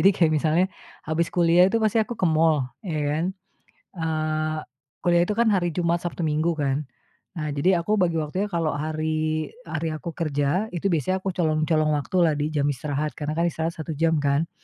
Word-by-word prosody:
jadi 195 Hz, -, +7 dB
kayak 160 Hz, -3 st, +3 dB
misalnya 155 Hz, +4 st, +3 dB, 0.4 s
habis 160 Hz, +2 st, 0 dB
kuliah 175 Hz, +1 st, +4 dB
itu 220 Hz, -, 0 dB
pasti 220 Hz, 0 st, +2 dB
aku 230 Hz, +1 st, -3 dB
ke -, -, -1 dB
mall, 155 Hz, -4 st, +3 dB, 0.2 s
ya 165 Hz, -7 st, -3 dB, 0.2 s
kan, -, -, 0 dB, 0.7 s
eee, 155 Hz, -1 st, -1 dB, 0.5 s
kuliah 175 Hz, -1 st, +4 dB
itu 210 Hz, -, -1 dB
kan 235 Hz, 0 st, +3 dB
hari 180 Hz, -4 st, +2 dB
Jumat, 170 Hz, -1 st, +1 dB
Sabtu, 175 Hz, -, -4 dB
Minggu, 160 Hz, +2 st, +1 dB
kan. 145 Hz, -1 st, -1 dB, 0.5 s
Nah, 155 Hz, -1 st, -2 dB
jadi 170 Hz, +4 st, +2 dB
aku 210 Hz, +5 st, +1 dB
bagi 170 Hz, -2 st, +2 dB
waktunya 160 Hz, +6 st, -1 dB
kalau 165 Hz, -5 st, 0 dB
hari 155 Hz, 0 st, -1 dB, 0.2 s
hari 160 Hz, 0 st, -2 dB
aku 155 Hz, +2 st, -5 dB
kerja, 155 Hz, +5 st, 0 dB
itu 175 Hz, -, -5 dB
biasanya 170 Hz, +2 st, +1 dB
aku 190 Hz, -, -2 dB
colong-colong 155 Hz, -1 st, +2 dB
waktu 145 Hz, +6 st, -3 dB
lah 160 Hz, -, +3 dB
di 150 Hz, +1 st, -1 dB
jam 145 Hz, -2 st, 0 dB
istirahat, 145 Hz, +1 st, -2 dB
karena 150 Hz, +4 st, -4 dB
kan 170 Hz, -, +2 dB
istirahat 165 Hz, 0 st, -2 dB
1 160 Hz, 0 st, -4 dB
jam, 160 Hz, +1 st, +2 dB
kan, 145 Hz, +3 st, +1 dB
160 Hz, 190 wpm, -24 LUFS, 155-175 Hz, 0.7 s, jadi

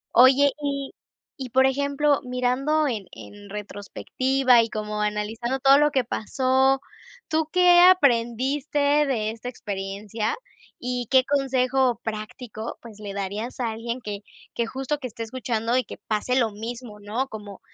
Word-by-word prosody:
Oye, 265 Hz, +3 st, +7 dB
y 280 Hz, -1 st, -3 dB, 0.4 s
y 260 Hz, -3 st, -6 dB
por 265 Hz, +3 st, +4 dB
ejemplo, 280 Hz, +2 st, +1 dB
mirando 255 Hz, +5 st, 0 dB
en 215 Hz, -7 st, -3 dB
en 205 Hz, -1 st, -12 dB
retrospectiva, 240 Hz, +5 st, +1 dB
y 230 Hz, -, -2 dB
como 210 Hz, -1 st, -4 dB
analizando 215 Hz, +4 st, -2 dB
todo 275 Hz, +2 st, +6 dB
lo 295 Hz, 0 st, +4 dB
que 265 Hz, -3 st, +1 dB
pasó, 265 Hz, +4 st, +1 dB, 0.5 s
¿tú 315 Hz, -1 st, 0 dB
qué 360 Hz, -1 st, +6 dB
aprendiste 275 Hz, -4 st, +3 dB, 0.3 s
de 220 Hz, -5 st, 0 dB
esta 230 Hz, +2 st, -7 dB
experiencia, 205 Hz, 0 st, -4 dB, 0.4 s
y 245 Hz, -2 st, -3 dB
qué 260 Hz, -1 st, +5 dB
consejo 265 Hz, -2 st, +1 dB
práctico, 220 Hz, +1 st, -6 dB
pues, 220 Hz, -3 st, -12 dB
le 205 Hz, -2 st, -6 dB
darías 205 Hz, +6 st, -4 dB
a 230 Hz, -2 st, -1 dB
alguien 235 Hz, +3 st, -5 dB
que 205 Hz, -2 st, -5 dB, 0.3 s
que 235 Hz, -1 st, -1 dB
justo 270 Hz, +4 st, -3 dB
que 255 Hz, -, -4 dB
esté 230 Hz, 0 st, -7 dB
escuchando 230 Hz, 0 st, -2 dB
y 255 Hz, -, +2 dB
que -, -, -10 dB
pase 220 Hz, +4 st, 0 dB
lo 225 Hz, -3 st, +1 dB
mismo, 225 Hz, 0 st, -7 dB
no? 220 Hz, +6 st, -3 dB
Como 210 Hz, -5 st, -9 dB
245 Hz, 150 wpm, -24 LUFS, 215-270 Hz, 0.5 s, Oye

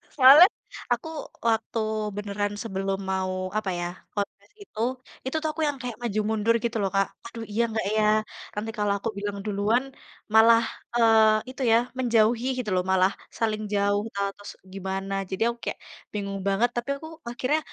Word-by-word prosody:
Soalnya, 285 Hz, +6 st, +10 dB, 0.4 s
aku 240 Hz, +5 st, 0 dB, 0.4 s
waktu 225 Hz, 0 st, 0 dB, 0.4 s
beneran 205 Hz, 0 st, -2 dB
sebelum 195 Hz, -2 st, -2 dB
mau 190 Hz, 0 st, -1 dB, 0.3 s
apa 215 Hz, -2 st, -1 dB
ya, 175 Hz, -, -1 dB, 0.3 s
confess 200 Hz, -1 st, -5 dB
itu, 305 Hz, -, -11 dB, 0.5 s
itu 260 Hz, -, -3 dB
tuh 315 Hz, -, -1 dB
aku 320 Hz, -, -5 dB
yang 290 Hz, -2 st, -1 dB
kayak 245 Hz, -2 st, -4 dB
maju 220 Hz, -3 st, -1 dB
mundur 220 Hz, +1 st, +2 dB
gitu 235 Hz, -1 st, -1 dB
loh, 195 Hz, -, +1 dB
Kak. 195 Hz, 0 st, +3 dB, 0.2 s
"Aduh, 230 Hz, -1 st, -7 dB
iya 225 Hz, +3 st, +1 dB
enggak 220 Hz, -3 st, -2 dB
ya?" 215 Hz, -, +3 dB, 0.5 s
Nanti 215 Hz, +2 st, -3 dB
kalau 205 Hz, -1 st, +1 dB
aku 225 Hz, +3 st, -3 dB
bilang 200 Hz, 0 st, -3 dB
duluan, 210 Hz, +4 st, +1 dB, 0.5 s
malah, 230 Hz, +1 st, +7 dB, 0.3 s
eee, 220 Hz, 0 st, +5 dB
itu 265 Hz, -, -9 dB
ya, 225 Hz, -, +7 dB, 0.2 s
menjauhi 235 Hz, -1 st, +3 dB
gitu 225 Hz, -, -3 dB
loh 180 Hz, -, +2 dB
malah 190 Hz, +1 st, +4 dB, 0.3 s
saling 215 Hz, -1 st, 0 dB
jauh 205 Hz, 0 st, +2 dB
ata 200 Hz, -, -5 dB, 0.2 s
terus 205 Hz, 0 st, -10 dB, 0.2 s
gimana. 195 Hz, 0 st, -4 dB, 0.2 s
Jadi 190 Hz, -, -4 dB
aku 235 Hz, 0 st, -2 dB
kayak -, -, -3 dB, 0.3 s
bingung 200 Hz, -1 st, -3 dB
banget, 200 Hz, +5 st, +3 dB
tapi 240 Hz, +3 st, -3 dB
aku 315 Hz, +3 st, -9 dB, 0.2 s
akhirnya, 255 Hz, +6 st, 0 dB
215 Hz, 170 wpm, -26 LUFS, 200-235 Hz, 0.5 s, Soalnya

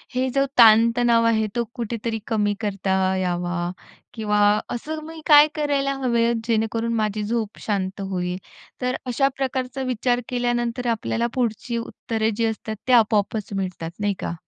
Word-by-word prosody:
हे 260 Hz, +1 st, +1 dB
जो 275 Hz, 0 st, +3 dB
ताण-तणाव 230 Hz, +1 st, +6 dB
आहे, 220 Hz, -1 st, +2 dB
तो 235 Hz, -, +1 dB
कुठेतरी 230 Hz, -1 st, -3 dB
कमी 210 Hz, -3 st, +1 dB
करता 190 Hz, -2 st, 0 dB
यावा 175 Hz, -1 st, -1 dB, 0.4 s
किंवा 210 Hz, -2 st, 0 dB, 0.3 s
असं 310 Hz, +6 st, -4 dB
मी 320 Hz, 0 st, -9 dB
काय 295 Hz, -1 st, +8 dB
करायला 280 Hz, -2 st, 0 dB
हवे 235 Hz, -2 st, +2 dB
आहे? 235 Hz, -, +2 dB
जेणेकरून 230 Hz, 0 st, 0 dB
माझी 215 Hz, -1 st, -1 dB
झोप 220 Hz, -1 st, -3 dB
शांत 195 Hz, -1 st, -2 dB
होईल. 180 Hz, -2 st, -3 dB, 0.4 s
तर 250 Hz, +1 st, 0 dB
अशा 255 Hz, +2 st, +2 dB
प्रकारचा 260 Hz, 0 st, -2 dB
विचार 245 Hz, 0 st, 0 dB
केल्यानंतर 240 Hz, 0 st, -1 dB
आपल्याला 230 Hz, +1 st, -1 dB
पुढची 235 Hz, -1 st, -2 dB
उत्तरे 225 Hz, -1 st, -2 dB
जी 230 Hz, -, 0 dB
असतात, 220 Hz, 0 st, -3 dB
ते 255 Hz, -, +3 dB
आपोआपच 215 Hz, -2 st, +2 dB
मिळतात, 180 Hz, -4 st, -4 dB
नाही 205 Hz, -1 st, +1 dB
का? -, -, -3 dB
230 Hz, 150 wpm, -23 LUFS, 205-245 Hz, 0.4 s, काय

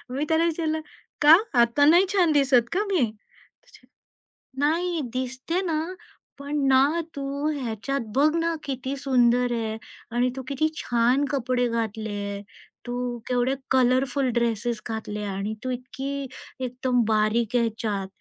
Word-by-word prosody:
मी 285 Hz, -, -1 dB
त्याला 320 Hz, +1 st, +3 dB
विचारलं, 315 Hz, -1 st, -1 dB, 0.4 s
"का 300 Hz, +2 st, +9 dB, 0.3 s
आता 235 Hz, +5 st, +3 dB
नाही 345 Hz, +5 st, +6 dB
छान 355 Hz, -5 st, +4 dB
दिसत 265 Hz, -5 st, +3 dB
का 390 Hz, +5 st, +1 dB
मी?" 355 Hz, -7 st, +2 dB
तुझे -, -, -24 dB, 0.7 s
"नाही 330 Hz, +3 st, +1 dB
दिसते 260 Hz, +8 st, -2 dB
ना, 325 Hz, -4 st, -1 dB, 0.6 s
पण 285 Hz, +1 st, -3 dB
ना 275 Hz, +6 st, +4 dB
तू 280 Hz, -, -4 dB, 0.4 s
ह्याच्यात 245 Hz, +4 st, -3 dB
बघ 295 Hz, +3 st, +5 dB
ना 335 Hz, 0 st, 0 dB
किती 265 Hz, 0 st, -4 dB
सुंदर 245 Hz, -2 st, +2 dB
आहे 220 Hz, -1 st, -2 dB, 0.4 s
आणि 250 Hz, +1 st, +2 dB
तू 265 Hz, -, -4 dB
किती 280 Hz, +3 st, +1 dB
छान 245 Hz, +4 st, +2 dB
कपडे 250 Hz, -2 st, 0 dB
घातले 220 Hz, -2 st, -3 dB
आहे, 200 Hz, 0 st, -4 dB, 0.4 s
तू 245 Hz, 0 st, -3 dB
केवढे 250 Hz, +2 st, +1 dB, 0.2 s
कलरफुल 260 Hz, +1 st, +2 dB
ड्रेसेस 235 Hz, -1 st, 0 dB
घातले 210 Hz, -2 st, -4 dB
आणि 200 Hz, +1 st, -3 dB
तू 255 Hz, -, -3 dB
इतकी 270 Hz, +2 st, -5 dB, 0.3 s
एकदम 250 Hz, -1 st, 0 dB
बारीक 220 Hz, +2 st, +1 dB
आहे 235 Hz, -, +4 dB
ह्याच्यात, 215 Hz, -4 st, -2 dB
255 Hz, 140 wpm, -25 LUFS, 235-285 Hz, 0.7 s, का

